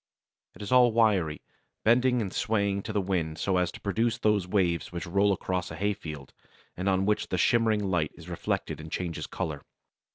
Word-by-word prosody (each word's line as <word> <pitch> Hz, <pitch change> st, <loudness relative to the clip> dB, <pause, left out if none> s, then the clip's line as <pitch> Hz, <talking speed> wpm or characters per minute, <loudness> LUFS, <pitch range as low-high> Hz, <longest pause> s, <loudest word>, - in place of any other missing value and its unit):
It -, -, -9 dB
is 100 Hz, -, -6 dB
all 125 Hz, -2 st, +6 dB
wiry, 100 Hz, -9 st, +2 dB, 0.4 s
bending 125 Hz, +1 st, +3 dB
and 95 Hz, -, -5 dB
swaying 100 Hz, -2 st, 0 dB
to 110 Hz, -, -5 dB
the 105 Hz, -, 0 dB
wind 85 Hz, -5 st, -1 dB
so 95 Hz, -2 st, 0 dB
as 90 Hz, -1 st, +1 dB
to -, -, -9 dB
produce 115 Hz, +3 st, 0 dB
those 105 Hz, -5 st, +1 dB
waves 90 Hz, -5 st, 0 dB
which 85 Hz, -2 st, -5 dB
roll 100 Hz, +4 st, +2 dB
across 90 Hz, -1 st, -2 dB
a -, -, -7 dB
hay 105 Hz, +1 st, 0 dB
field, 75 Hz, -7 st, -9 dB, 0.4 s
and 95 Hz, +2 st, -1 dB
on 95 Hz, 0 st, +2 dB
which 105 Hz, +1 st, +1 dB
the 90 Hz, -, -2 dB
shimmering 110 Hz, +2 st, +3 dB
light 90 Hz, -6 st, 0 dB
is 85 Hz, 0 st, -13 dB
reflected 85 Hz, -2 st, -3 dB
and 80 Hz, 0 st, -10 dB
changes 85 Hz, -3 st, -3 dB
colour. 75 Hz, -3 st, -4 dB
95 Hz, 195 wpm, -28 LUFS, 85-105 Hz, 0.4 s, all